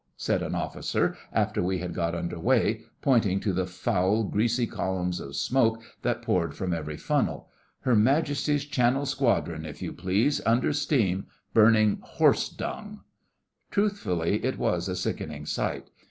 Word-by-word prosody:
said - - 0
an - - -3
officer - - -1 0.2
after - - +1
we 95 +1 0
had 90 -1 -4
got 85 0 -1
under 85 0 -4
way, 115 0 +2 0.2
pointing 110 -8 +3
to 100 -2 -1
the 90 0 0
foul, 95 +3 +1
greasy 115 +4 +1
columns 90 -4 -2
of 70 0 -7
smoke 115 - +2 0.2
that - - -1
poured 85 -5 0
from 90 -2 -2
every 75 -2 -4
funnel. - - -1 0.3
'Her 125 - +2
Majesty's 145 +4 +2
Channel 135 -1 +1
Squadron, 120 - 0
if 75 -2 -8
you - - -5
please, 100 +11 +1
under 120 +5 +2
steam, 120 - +1 0.3
burning 110 -1 +5
horse - - +2
dung.' - - -6 0.7
Truthfully, 105 - 0
it 130 +1 -1
was 90 +2 0
a 90 - -2
sickening 75 -4 -4
sight. - - -3
105 Hz, 150 wpm, -27 LUFS, 90-125 Hz, 0.7 s, burning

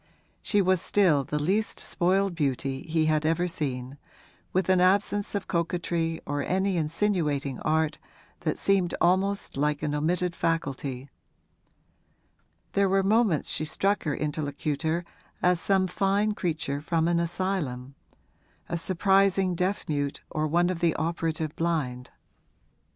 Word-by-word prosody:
She 205 -2 +2
was 185 -1 +2
still 175 -10 +3
the 150 - -3
least 195 +9 0
spoiled 190 +2 +1
beauty 135 -3 -1
he 160 0 +2
had 155 -1 +2
ever 165 +3 +1
seen, 135 -4 -4 0.5
with 185 -1 +1
an 185 -1 +4
absence 205 +2 +2
of 200 - -3
coquetry 170 -1 -1
or 145 0 -2
any 190 +3 0
insinuating 155 - 0
art 160 0 0 0.4
that - - -1
seemed 195 -3 +2
almost 190 0 +1
like 150 +1 0
an 150 -1 -1
omitted 170 +4 0
faculty; 140 -5 -2 1.6
there 200 -1 +3
were 195 0 +3
moments 210 -5 +2
when - - -1
she 155 - -2
struck 195 +6 0
her 150 -3 0
interlocutor 155 +2 -2 0.4
as 180 -1 +4
some 190 -1 +2
fine 195 +3 +1
creature 160 -7 -2
from 165 +1 +1
an 170 0 +2
asylum 170 -7 -2 0.8
a 170 - -1
surprising 190 +1 +2
deaf 180 +4 -1
mute 145 -2 -2
or 155 0 0
one 175 +3 +2
of 175 - -4
the 170 -2 +2
operative 160 -1 -2
blind. 145 -7 -2
170 Hz, 135 wpm, -27 LUFS, 150-190 Hz, 1.6 s, an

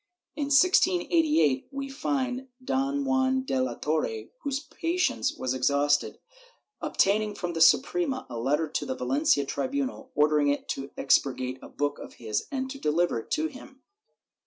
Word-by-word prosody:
In 290 -1 -1
1688 315 - +3
we 275 0 -5
find 265 -2 -2 0.2
Don 275 +1 0
Juan 265 0 +2
de 135 - -1
la 125 -2 -1
Torre, 115 -8 -2
whose 275 -1 -2
patience 335 +4 -1
was 130 0 -1
exhausted, 140 +3 +1 0.6
obtaining 210 +1 +1
from 175 -3 -4
the 165 - -2
Suprema 275 - +3
a 115 - -6
letter 150 +6 +1
to - - -3
the 260 - -2
Valencia 275 - +1
tribunal 270 - -3
ordering 150 0 +3
it 145 0 0
to 135 0 -4
expurgate 130 -1 +1
a - - -11
book 145 0 -2
of - - -10
his 110 -2 -3
and 265 -1 -2
deliver 155 -3 +1
it - - -11
to 315 - 0
him. 270 -2 -9
255 Hz, 150 wpm, -27 LUFS, -, 0.6 s, 1688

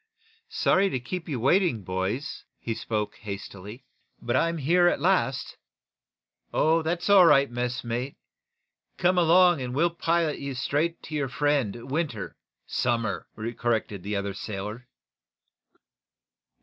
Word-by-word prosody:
"Sorry 195 +1 +2
to 130 - -2
keep 165 +8 -6
you 135 -5 -2
waiting, 135 - +2
boys," 95 +9 -3
he 115 - -4
spoke, 105 -1 -3
hastily. 100 +3 -8 0.3
"But 120 - -2
I'm 165 0 +1
here 175 +5 +3
at 175 - +2
last." 160 -6 0 0.9
"Oh, 165 +1 +3
that's 170 +2 -2
all 195 -4 +7
right, 140 -4 +5
messmate. 120 +1 -3 0.8
Come 180 0 +3
along 175 -2 +5
and 125 0 -4
we'll 170 +4 +2
pilot 165 -2 0
you 140 -1 -5
straight 150 +7 -1
to - - -9
your 145 -3 -1
friend, 130 -4 -1
Winter 140 - -2 0.2
" - - -57 0.2
"Somers," 115 -5 0 0.3
corrected 110 -4 -1
the 105 +3 -3
other 100 0 -2
sailor. 105 +4 -6
135 Hz, 130 wpm, -26 LUFS, 115-165 Hz, 0.9 s, all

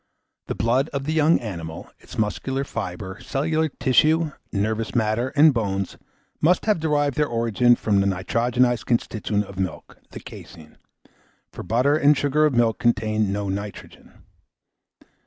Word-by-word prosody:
The - - -3
blood 125 +7 +1
of 140 -1 -2
the 155 +3 -2
young 160 +1 +4
animal, 85 -7 -7
its - - -13
muscular 110 +7 -1
fibre, 95 -5 -6
cellular 155 +3 -1
tissue, 155 +4 +2 0.2
nervous 110 +3 -2
matter, 110 +1 +1
and 150 0 +6
bones, 100 -5 -2 0.5
must 175 +4 +3
have 215 -5 +2
derived 145 -3 0
their 150 -1 +2
origin 115 +1 +2
from 105 -4 +1
the 100 - +1
nitrogenised 120 +5 0
constituent 110 -3 -1
of 95 -1 -10
milk 90 -6 -5
the - - -9
caseine; 80 -2 -13 0.7
for - - -8
butter 130 +6 +2
and 150 -1 +4
sugar 145 +2 +2
of 140 - -2
milk 115 -2 +2
contain 110 -3 +1
no 100 0 -2
nitrogen. 100 +1 -8
120 Hz, 145 wpm, -23 LUFS, 105-145 Hz, 0.7 s, and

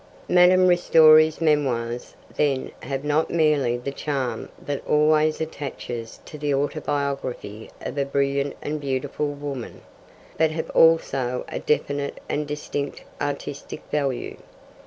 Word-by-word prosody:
Madame 180 +1 +6
Ristori's 160 -3 +6
memoirs, 125 -7 0 0.2
then, 140 -3 0
have 135 0 -4
not 150 +2 +1
merely 150 -7 +2
the 125 +3 -5
charm 135 -5 -3
that 145 -1 -4
always 155 +1 +3
attaches 130 -7 -6
to 150 - -10
the 145 0 -1
autobiography 140 -6 -3
of - - -5
a 140 - +1
brilliant 140 0 0
and 150 0 -3
beautiful 135 +2 -2
woman, 145 -3 -6 0.6
but 160 0 +4
have 160 +1 -4
also 135 -6 +3
a - - -4
definite 140 -1 -1
and 150 0 -2
distinct 145 -1 -4 0.2
artistic 145 0 -4
value. 140 -4 -2
145 Hz, 120 wpm, -24 LUFS, 135-155 Hz, 0.6 s, Madame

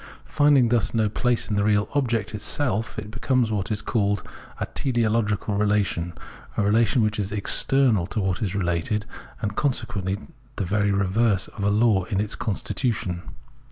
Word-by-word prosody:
Finding 145 -5 +4
thus 120 -1 +1
no 110 -2 +2
place 120 +2 0
in 105 - -1
the 100 - +2
real 105 0 +2
object 120 -7 0
itself, 110 0 -1
it 105 -1 -6
becomes 120 0 +1
what 100 -3 -1
is 105 -2 -2
called 100 -4 0 0.4
a - - -1
" - - -23
teleological 110 -5 0
relation," 100 -5 +1 0.4
a - - +2
relation 110 +3 +3
which 105 0 0
is 100 -1 -2
external 110 -1 +2
to 110 - -3
what 95 -3 -1
is 100 -2 -1
related, 95 +3 -1 0.4
and 100 -1 -2
con 145 - +2
sequently 100 -2 -3 0.4
the 100 - -2
very 100 +2 +1
reverse 100 +1 +1
of 100 - -7
a 100 - +3
law 105 -1 +3
of 100 -2 -1
its 105 0 -2
constitution. 100 -4 -2
105 Hz, 170 wpm, -24 LUFS, 100-115 Hz, 0.4 s, Finding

